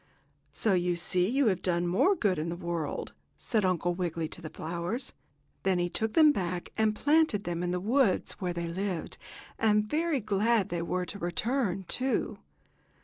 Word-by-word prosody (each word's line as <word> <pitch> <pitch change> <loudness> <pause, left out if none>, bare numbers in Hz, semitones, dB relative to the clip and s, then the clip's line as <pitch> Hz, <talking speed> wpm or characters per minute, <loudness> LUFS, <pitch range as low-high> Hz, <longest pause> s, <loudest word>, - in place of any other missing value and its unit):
"So 215 - +1
you 180 -1 +1
see 180 +2 +2
you 275 +3 +2
have 190 -5 +2
done 175 -1 0
more 195 - +3
good 200 - +1
in 160 +2 -2
the 170 - -3
world," 170 -4 -4 0.2
said 220 -3 0
Uncle 175 -1 +1
Wiggily 170 -2 -2
to - - -9
the 155 - -6
flowers. 170 - -4 0.5
Then 190 +2 +1
he 175 0 0
took 220 +2 0
them 310 -2 +7
back 180 -7 -3
and 220 -1 +2
planted 295 -6 +3
them 175 -1 -3
in 180 - -1
the 180 0 -1
woods 225 +1 +2
where 180 -1 -1
they 170 -1 -3
lived, 180 0 -4 0.4
and 210 -1 +3
very 310 +4 0
glad 215 0 +1
they 170 -1 -2
were 180 +2 -1
to 200 - -7
return, 195 +2 -1
too. 260 0 -1
185 Hz, 180 wpm, -29 LUFS, 175-220 Hz, 0.5 s, them